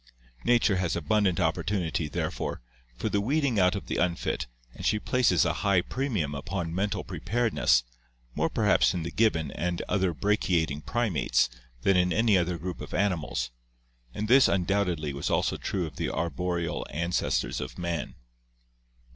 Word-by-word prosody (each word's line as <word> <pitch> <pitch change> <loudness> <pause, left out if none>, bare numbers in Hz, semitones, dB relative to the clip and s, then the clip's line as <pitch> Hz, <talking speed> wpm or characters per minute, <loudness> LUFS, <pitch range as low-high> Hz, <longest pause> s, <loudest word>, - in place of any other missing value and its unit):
Nature 115 -5 +3
has 90 -3 0
abundant 95 +3 +1
opportunity, 85 -1 0
therefore, 75 - -3 0.4
for - - -2
the 100 -1 +1
weeding 135 -1 +1
out 90 +2 +4
of 100 - -5
the - - -3
unfit 85 -7 -1 0.3
and - - -10
she 105 - +2
places 105 - +2
a - - +1
high 100 -2 +3
premium 105 - -2
upon 85 +4 -4
mental 100 +3 -1
preparedness, 105 - +1 0.5
more - - 0
perhaps 60 -1 +3
in 85 - -2
the 85 - -4
gibbon 90 -8 +1
and 85 +1 -2
other 95 -3 +1
brachiating 85 -5 0
primates 110 - +1 0.3
than 95 - +4
in 90 0 +3
any 110 0 +3
other 90 -1 +1
group 90 +2 -6
of - - -6
animals, 90 -10 -1 0.6
and 105 - -3
this 130 +4 +7
undoubtedly 90 -5 0
was 70 - -3
also - - +1
true 95 -3 -2
of 75 -5 -9
the - - -1
arboreal 85 +2 -2
ancestors 85 +3 -1
of 65 - -7
man. 85 -2 -3
90 Hz, 155 wpm, -28 LUFS, 80-105 Hz, 0.6 s, this